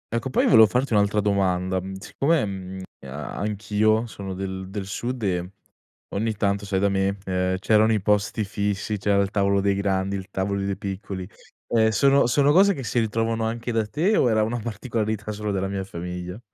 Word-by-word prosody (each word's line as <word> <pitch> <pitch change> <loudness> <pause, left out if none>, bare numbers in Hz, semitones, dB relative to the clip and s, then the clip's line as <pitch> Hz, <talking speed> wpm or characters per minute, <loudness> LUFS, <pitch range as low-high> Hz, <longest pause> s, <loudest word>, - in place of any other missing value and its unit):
Ecco 115 +3 -2
poi - - +2
volevo 110 -3 +7
farti 125 +3 0
un'altra 105 0 +3
domanda. 95 -2 +1
Mhmm, 95 +1 -7
siccome, 140 +9 0
mhmm, 95 -1 -6 0.3
a 70 +3 -6
anch'io 105 +2 +1
sono 100 -4 -7
del 95 0 -5
del 95 -1 -5
sud 120 +4 -4
e 90 -2 -1 0.6
ogni 110 +2 -1
tanto 100 -1 -1
sai 95 -1 0
da 100 - +3
me, 100 +1 0
ehm, 95 0 0
c'erano 110 +3 +3
i 110 - +2
posti 105 +2 +1
fissi, 100 0 -2
c'era 100 0 +2
il 100 - -4
tavolo 100 -1 +2
dei 100 0 +2
grandi, 100 0 0
il 95 -1 -5
tavoli 100 0 -2
dei 100 -1 -2
piccoli, 95 -1 -5 0.4
ehm, 110 -1 +3
sono 140 +4 +4
sono 140 +4 +3
cose 195 +4 +5
che 135 - -6
si 120 0 0
ritrovano 115 +1 0
anche 115 +2 -3
da 110 -2 0
te 170 - +1
o 125 - +3
era 110 -1 +3
una 115 +3 -2
particolarità 110 -1 -3
solo 105 0 -4
della 95 -1 -1
mia 95 0 -3
famiglia? 90 +1 -6
100 Hz, 190 wpm, -24 LUFS, 95-110 Hz, 0.6 s, volevo